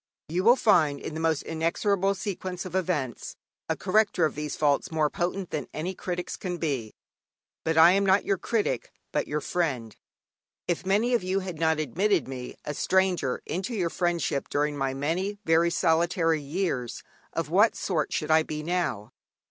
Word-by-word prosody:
You 175 Hz, +4 st, 0 dB
will 235 Hz, +4 st, +7 dB
find 155 Hz, -, +3 dB
in -, -, -6 dB
the 160 Hz, -2 st, 0 dB
inexorable 195 Hz, +4 st, +1 dB
sequence 185 Hz, -2 st, -4 dB
of 180 Hz, -, -7 dB
events 170 Hz, -10 st, -2 dB, 0.3 s
a -, -, +1 dB
corrector 200 Hz, -3 st, +2 dB
of 155 Hz, -, -1 dB
these 150 Hz, 0 st, -4 dB
faults 145 Hz, -2 st, +1 dB
more 155 Hz, -2 st, +1 dB
potent 180 Hz, +1 st, -2 dB
than 150 Hz, -, -3 dB
any 165 Hz, +5 st, -2 dB
critics 180 Hz, -1 st, -4 dB
can 180 Hz, -2 st, -4 dB
be. 135 Hz, -10 st, -3 dB, 0.7 s
But 160 Hz, 0 st, 0 dB
I 165 Hz, +2 st, +9 dB
am 195 Hz, +2 st, +3 dB
not 195 Hz, +1 st, +3 dB
your 195 Hz, -3 st, +1 dB
critic, 210 Hz, -, -1 dB, 0.2 s
but -, -, -1 dB
your 150 Hz, +1 st, -2 dB
friend. 135 Hz, -11 st, -2 dB, 0.7 s
If 175 Hz, +2 st, -2 dB
many 215 Hz, +6 st, +2 dB
of 240 Hz, -, +3 dB
you 185 Hz, +2 st, 0 dB
had 180 Hz, -4 st, -6 dB
not 160 Hz, -1 st, +2 dB
admitted 185 Hz, +4 st, +1 dB
me, 130 Hz, -2 st, -6 dB
a 150 Hz, -, -3 dB
stranger, 185 Hz, -5 st, +1 dB
into 190 Hz, +8 st, -3 dB
your 175 Hz, -5 st, 0 dB
friendship 170 Hz, -6 st, -1 dB
during 145 Hz, 0 st, 0 dB
my 135 Hz, -1 st, -1 dB
many 175 Hz, +9 st, -1 dB
very 165 Hz, +1 st, +4 dB
solitary 165 Hz, -1 st, +2 dB
years, 140 Hz, -5 st, -3 dB, 0.3 s
of 165 Hz, -2 st, -3 dB
what 205 Hz, +5 st, +5 dB
sort 165 Hz, -6 st, -1 dB
should 155 Hz, +1 st, -1 dB
I 160 Hz, 0 st, +6 dB
be 155 Hz, -1 st, -5 dB
now? 155 Hz, -, -2 dB
170 Hz, 170 wpm, -27 LUFS, 150-190 Hz, 0.7 s, I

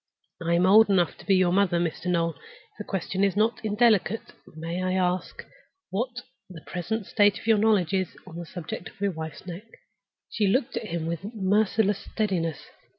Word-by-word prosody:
I 170 Hz, +1 st, +2 dB
am 175 Hz, +1 st, +3 dB
old 210 Hz, +3 st, +7 dB
enough 180 Hz, -4 st, +2 dB
to -, -, -14 dB
be 195 Hz, -, +5 dB
your 185 Hz, -2 st, +3 dB
mother, 190 Hz, -3 st, +3 dB
Mr. 170 Hz, +1 st, -2 dB
Noel. 170 Hz, -2 st, +1 dB
If 455 Hz, -, -20 dB
the -, -, -4 dB
question 195 Hz, 0 st, -2 dB
is 195 Hz, -2 st, +2 dB
not 220 Hz, +3 st, +1 dB
indelicate, 215 Hz, -1 st, +2 dB, 0.2 s
may 165 Hz, +3 st, -4 dB
I 185 Hz, 0 st, 0 dB
ask 180 Hz, -1 st, -1 dB, 0.5 s
what 245 Hz, +4 st, -3 dB, 0.3 s
the 165 Hz, -4 st, -11 dB
present 205 Hz, +4 st, -3 dB
state 205 Hz, 0 st, +3 dB
of -, -, -11 dB
your 220 Hz, -2 st, +4 dB
knowledge 205 Hz, -5 st, +3 dB
is 185 Hz, -2 st, -1 dB
on 170 Hz, -3 st, -10 dB
the 170 Hz, -1 st, -6 dB
subject 175 Hz, 0 st, -6 dB
of 215 Hz, -, -23 dB
your 200 Hz, 0 st, +1 dB
wife's 160 Hz, 0 st, -7 dB
neck?" 180 Hz, +4 st, -7 dB, 0.7 s
She 210 Hz, -3 st, +1 dB
looked 250 Hz, +6 st, +1 dB
at 235 Hz, -2 st, -3 dB
him 170 Hz, -3 st, -3 dB
with 170 Hz, +1 st, -3 dB
a 205 Hz, -, -5 dB
merciless 205 Hz, 0 st, +2 dB
steadiness. 180 Hz, -7 st, -2 dB
190 Hz, 195 wpm, -26 LUFS, 175-215 Hz, 0.7 s, old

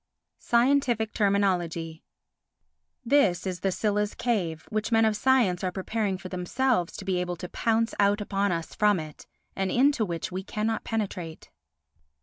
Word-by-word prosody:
Scientific 240 Hz, -3 st, +2 dB
Terminology 175 Hz, -6 st, 0 dB, 1.0 s
This 220 Hz, -10 st, +3 dB
is 185 Hz, -2 st, -3 dB
the 195 Hz, +3 st, 0 dB
Scylla's 210 Hz, +1 st, -1 dB
cave 175 Hz, -10 st, -1 dB
which 215 Hz, +1 st, -2 dB
men 225 Hz, 0 st, +4 dB
of 215 Hz, -1 st, +2 dB
science 225 Hz, -7 st, +2 dB
are 185 Hz, -, 0 dB
preparing 195 Hz, +1 st, -2 dB
for 185 Hz, -, -8 dB
themselves 185 Hz, +2 st, -1 dB
to 195 Hz, -, -8 dB
be 185 Hz, -2 st, 0 dB
able 180 Hz, 0 st, -3 dB
to 180 Hz, -, -7 dB
pounce 225 Hz, +2 st, 0 dB
out 205 Hz, +1 st, +3 dB
upon 200 Hz, -1 st, 0 dB
us 165 Hz, -1 st, -3 dB
from 210 Hz, -3 st, +3 dB
it, 155 Hz, -1 st, -9 dB, 0.3 s
and 195 Hz, -1 st, -1 dB
into 265 Hz, 0 st, +3 dB
which 170 Hz, -4 st, -4 dB
we 185 Hz, +1 st, -3 dB
cannot 215 Hz, +3 st, -2 dB
penetrate. 185 Hz, -7 st, -4 dB
200 Hz, 150 wpm, -27 LUFS, 180-225 Hz, 1.0 s, men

